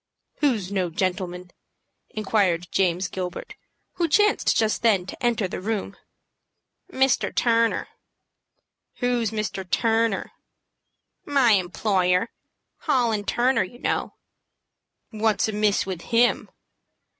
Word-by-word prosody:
"Who's 225 -10 0
no 185 -3 0
gentleman?" 180 0 -3 0.6
inquired 195 -5 0
James 185 -1 +1
Gilbert, 180 -2 -6 0.4
who 340 - +1
chanced 415 +6 +3
just 220 -1 +1
then 205 -6 +3
to 220 - -10
enter 230 -5 +1
the 185 - -6
room. 200 -1 -3 1.0
"Mr. 265 -4 +1
Turner." 230 -1 +2 1.1
"Who's 245 -3 0
Mr. 215 -3 -3
Turner?" 225 +1 +1 0.9
"My 275 -5 +3
employer, 185 0 +1 0.5
Hall 245 -7 +1
& - - -23
Turner, 255 +2 +2
you 185 +6 -10
know." - - -2 1.0
"What's 220 -1 +1
amiss 210 -1 +1
with 185 -3 -5
him?" 235 +4 +1
215 Hz, 105 wpm, -24 LUFS, 185-235 Hz, 1.1 s, chanced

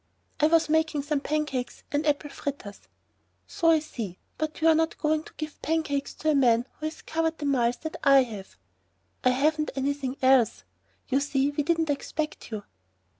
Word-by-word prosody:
"I 300 - +5
was 330 0 +4
making 315 -2 +1
some 295 0 0
pancakes 290 -4 -2
and 295 +2 0
apple 290 0 0
fritters." 270 -8 -6 0.6
"So 330 - +1
I 325 - +6
see, 230 - -6 0.2
but 310 0 -3
you're 325 0 +5
not 320 +1 +1
going 310 0 +1
to - - -14
give 310 -1 -6
pancakes 300 -3 -1
to 310 - +1
a - - +2
man 245 -4 +4
who 310 - -2
has 310 - -8
covered 325 0 -1
the 295 - -5
miles 245 -4 +2
that 315 - -5
I 275 -2 +7
have." 210 -6 -9 0.7
"I 255 - +5
haven't 305 +4 +1
anything 275 -1 -2
else. 260 -4 +4 0.4
You 270 0 +2
see 280 0 +1
we 290 - -1
didn't 325 0 +1
expect 305 +2 -4
you." 215 -3 -5
290 Hz, 175 wpm, -27 LUFS, 270-310 Hz, 0.7 s, I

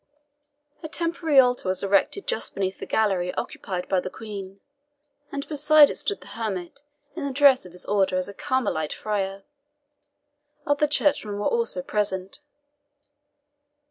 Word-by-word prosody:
A 315 - -5
temporary 330 -2 -1
altar 250 -6 +3
was 185 - 0
erected 200 - +1
just - - -2
beneath 190 -1 -2
the - - -7
gallery 190 -5 +1
occupied 180 -2 -4
by 190 - +2
the 185 - -4
Queen, 200 -2 -8 0.7
and 280 0 -5
beside 300 0 +6
it - - -6
stood 410 - -3
the - - -14
hermit 210 +1 -4 0.3
in 335 - -5
the 280 - -2
dress 265 -5 +5
of - - -15
his 180 - -6
order 195 -2 +1
as 185 - -1
a 200 - -8
Carmelite 200 -12 -1
friar. 195 -2 -3 1.2
Other 290 +1 +2
churchmen 285 -8 +1
were 205 - -3
also 465 - 0
present. 195 +1 -2
210 Hz, 145 wpm, -25 LUFS, 190-290 Hz, 1.2 s, beside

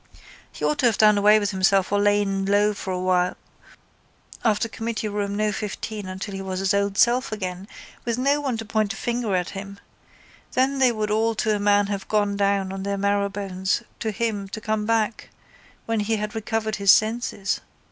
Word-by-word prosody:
He - - -4
ought 300 - 0
to 255 - +4
have 225 - +1
done 210 -1 +6
away 210 +1 +6
with 205 0 0
himself 190 0 +2
or 205 - +2
lain 205 -1 +2
low 205 +1 +3
for 200 -2 -5
a 180 -1 +2
time - - -8 1.1
after 220 -1 +2
committee 225 0 -4
room 205 -1 -2
no 215 0 +1
15 210 -1 -5
until 190 +2 -6
he 195 - -5
was 190 -1 -4
his 195 +1 +1
old 200 0 0
self 245 +1 +3
again 185 -2 -5 0.4
with 235 -1 -1
no 280 +3 +2
one 265 -5 -1
to 225 - -6
point 215 -1 0
a - - -9
finger 235 -4 -1
at 180 -1 -1
him. 200 0 -8 0.7
Then 265 +2 +1
they 255 -2 +5
would 215 -2 -2
all 225 +1 +1
to 215 0 +1
a - - -2
man 205 0 +3
have 200 -1 -4
gone 205 -1 +1
down 200 -1 +1
on 195 - -5
their 200 +1 -2
marrowbones 200 0 -1 0.2
to 220 - -2
him 210 -2 -2
to 215 - -6
come 215 -1 -2
back 225 -1 0 0.6
when 225 -1 0
he 215 +2 0
had 210 0 -3
recovered 220 -1 -2
his 200 -1 0
senses. 215 -2 +1
205 Hz, 200 wpm, -24 LUFS, 200-220 Hz, 1.1 s, done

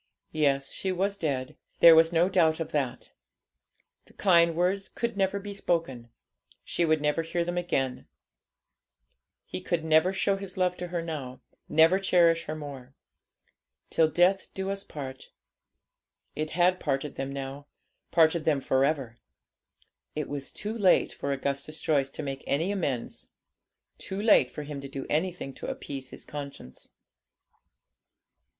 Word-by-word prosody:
Yes, 140 -3 +1
she 190 - -2
was 195 +2 0
dead; 135 -8 -3 0.2
there 170 - +10
was 165 +1 +5
no 170 +1 +3
doubt 165 -4 +3
of 165 - -4
that. 130 -4 -2 0.9
The - - -21
kind 170 -4 +4
words 185 +3 0
could 235 -2 -3
never 195 0 +1
be 200 0 -7
spoken, 165 -11 -2 0.5
she 175 - -1
would 155 -2 +2
never 150 +2 +1
hear 170 +1 -2
him 175 +1 -3
again, 135 -7 -1 1.4
he 90 - -6
could 170 -2 -1
never 160 +3 +4
show 195 +1 +1
his 195 -2 -7
love 180 -1 +1
to 180 - -5
her 175 -1 -3
now, 140 -6 -6 0.3
never 160 +5 +5
cherish 170 -3 +3
her 155 - -4
more. 140 -3 -9 1.0
'Till 160 -1 +4
death 180 +4 +2
us 195 +1 -2
do - - -22
part.' 135 -3 -7 1.1
It 155 0 -2
had 180 +3 +2
parted 140 -1 -2
them 135 0 -4
now, 140 +1 -6 0.4
parted 165 -1 +4
them 150 -3 +2
for 130 0 +1
ever. 135 -6 -1 1.0
It 150 -1 -2
was 140 -1 -5
too 215 +2 -5
late 195 -5 +4
for 140 - -3
Augustus 140 +3 -3
Joyce 140 -4 +1
to 150 - -6
make 135 -1 -5
any 165 +8 +1
amends; 145 -12 -3 0.7
too 190 - -5
late 205 - +5
for 150 - -7
him 145 -1 -6
to 140 - -8
do 135 0 -6
anything 165 -3 -1
to - - -8
appease 135 -2 -6
his - - -10
conscience. 140 - -8
160 Hz, 150 wpm, -28 LUFS, 140-180 Hz, 1.4 s, there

